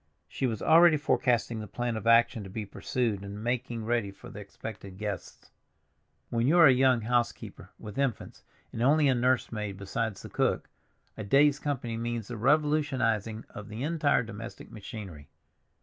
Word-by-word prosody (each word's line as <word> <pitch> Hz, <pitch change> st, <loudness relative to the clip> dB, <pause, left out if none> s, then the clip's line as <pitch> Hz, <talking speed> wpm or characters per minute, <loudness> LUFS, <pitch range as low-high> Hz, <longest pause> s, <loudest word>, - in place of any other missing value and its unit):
She 95 Hz, +11 st, -2 dB
was 110 Hz, -4 st, -3 dB
already 165 Hz, 0 st, +6 dB
forecasting 120 Hz, -6 st, +1 dB
the 105 Hz, -, -6 dB
plan 120 Hz, 0 st, -3 dB
of 110 Hz, +1 st, -4 dB
action 115 Hz, -1 st, +4 dB
to 95 Hz, -, -9 dB
be 105 Hz, +2 st, -5 dB
pursued 110 Hz, 0 st, -2 dB
in 100 Hz, +2 st, -7 dB
making 120 Hz, -2 st, -2 dB
ready 115 Hz, -3 st, 0 dB
for 95 Hz, -, -12 dB
the -, -, -9 dB
expected 100 Hz, -1 st, -9 dB
guests. 100 Hz, -3 st, -6 dB, 0.8 s
When 115 Hz, +1 st, +1 dB
you 165 Hz, +5 st, +4 dB
are 170 Hz, -, +8 dB
a 135 Hz, -, +8 dB
young 130 Hz, -2 st, +3 dB
housekeeper 120 Hz, +1 st, -2 dB
with 105 Hz, +4 st, -8 dB
infants 135 Hz, -5 st, -2 dB, 0.3 s
and 115 Hz, -, -4 dB
only 145 Hz, +4 st, +4 dB
a 135 Hz, -, +4 dB
nurse 125 Hz, +1 st, +1 dB
maid 105 Hz, -3 st, -4 dB
besides 100 Hz, +1 st, -3 dB
the -, -, -8 dB
cook, -, -, 0 dB, 0.5 s
a -, -, -5 dB
day's 140 Hz, +7 st, +4 dB
company 125 Hz, -6 st, -3 dB
means 115 Hz, -2 st, -4 dB
the 120 Hz, -, -5 dB
revolutionizing 130 Hz, -5 st, +1 dB
of 105 Hz, +1 st, -9 dB
the 110 Hz, +4 st, -5 dB
entire 150 Hz, -5 st, +2 dB
domestic 115 Hz, +1 st, -9 dB
machinery. 100 Hz, -, -9 dB
115 Hz, 170 wpm, -29 LUFS, 105-130 Hz, 0.8 s, are